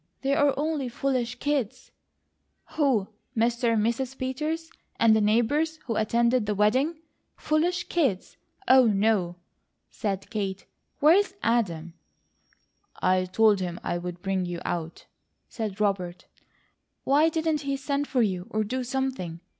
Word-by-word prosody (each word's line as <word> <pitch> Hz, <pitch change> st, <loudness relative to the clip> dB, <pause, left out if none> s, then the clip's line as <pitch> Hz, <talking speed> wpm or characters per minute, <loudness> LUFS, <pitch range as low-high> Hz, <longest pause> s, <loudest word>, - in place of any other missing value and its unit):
They're 275 Hz, 0 st, +2 dB
only 295 Hz, -3 st, -1 dB
foolish 250 Hz, -1 st, -1 dB
kids!" 275 Hz, -4 st, -2 dB, 0.8 s
"Who? 265 Hz, -10 st, +1 dB, 0.3 s
Mr. 235 Hz, +1 st, +2 dB
and 215 Hz, -1 st, +2 dB
Mrs. 255 Hz, +3 st, -2 dB
Peters, 305 Hz, +6 st, -3 dB, 0.3 s
and 225 Hz, -1 st, +5 dB
the 220 Hz, -, +3 dB
neighbours, 265 Hz, +10 st, +2 dB
who 230 Hz, -, -2 dB
attended 235 Hz, +1 st, +2 dB
the 210 Hz, -, 0 dB
wedding! 265 Hz, -, +1 dB, 0.3 s
Foolish 340 Hz, +4 st, 0 dB
kids? 270 Hz, -, 0 dB, 0.3 s
Oh, 260 Hz, -1 st, +7 dB
no!" 200 Hz, -4 st, +1 dB, 0.6 s
said 200 Hz, 0 st, -4 dB
Kate. 195 Hz, -3 st, -3 dB, 0.4 s
"Where's 375 Hz, +6 st, +4 dB
Adam?" 175 Hz, -8 st, 0 dB, 1.1 s
"I 185 Hz, 0 st, +2 dB
told 205 Hz, +2 st, +3 dB
him 175 Hz, -2 st, -4 dB
I'd 175 Hz, +1 st, -4 dB
bring 190 Hz, -1 st, 0 dB
you 175 Hz, -1 st, -4 dB
out," 165 Hz, -1 st, -4 dB, 0.4 s
said 215 Hz, -4 st, -5 dB
Robert. 190 Hz, -4 st, -1 dB, 0.8 s
"Why 295 Hz, +4 st, +4 dB
didn't 320 Hz, -1 st, 0 dB
he 275 Hz, -1 st, -2 dB
send 280 Hz, +1 st, -2 dB
for 250 Hz, -3 st, +2 dB
you, 185 Hz, -3 st, -2 dB
or 215 Hz, 0 st, 0 dB
do 255 Hz, +5 st, -3 dB
something?" 250 Hz, -10 st, -3 dB
235 Hz, 130 wpm, -26 LUFS, 195-280 Hz, 1.1 s, Oh